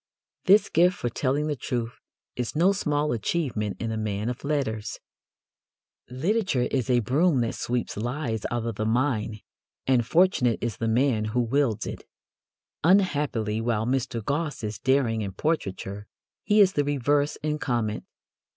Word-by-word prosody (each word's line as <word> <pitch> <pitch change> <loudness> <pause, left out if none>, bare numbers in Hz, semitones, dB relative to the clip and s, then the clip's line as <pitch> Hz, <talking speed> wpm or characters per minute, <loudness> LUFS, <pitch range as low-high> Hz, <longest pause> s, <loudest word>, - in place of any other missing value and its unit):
This 200 +3 +6
gift 180 +3 +3
for 120 - -2
telling 140 +5 0
the 150 -1 -1
truth 120 -2 -3 0.4
is 125 0 -3
no 175 +5 +4
small 150 -6 0
achievement 115 -3 -1
in 115 -1 -2
a 110 - -2
man 105 +1 -2
of 125 - -5
letters. 135 -8 -2 1.1
Literature 160 - 0
is 130 -2 -1
a 120 -1 +4
broom 140 - +2
that 115 - -1
sweeps 120 0 -2
lies 120 -1 -2
out 120 -1 -2
of 115 -3 -3
the 110 - -1
mind, 110 -3 0 0.4
and 130 -3 +3
fortunate 160 - +3
is 115 -3 -3
the 115 - -2
man 115 -1 +2
who 115 +3 0
wields 120 -3 0
it. - - -6 0.8
Unhappily, 145 - +2
while 115 -2 0
Mr. 120 -3 -1
Gosse 145 -1 -2
is 105 0 -4
daring 130 -4 +2
in 100 -2 -4
portraiture, 100 - -3 0.4
he 210 0 +4
is 195 -1 +5
the 145 - +2
reverse 145 +1 +1
in 150 0 -1
comment. 115 -6 -1
125 Hz, 155 wpm, -26 LUFS, 110-150 Hz, 1.1 s, This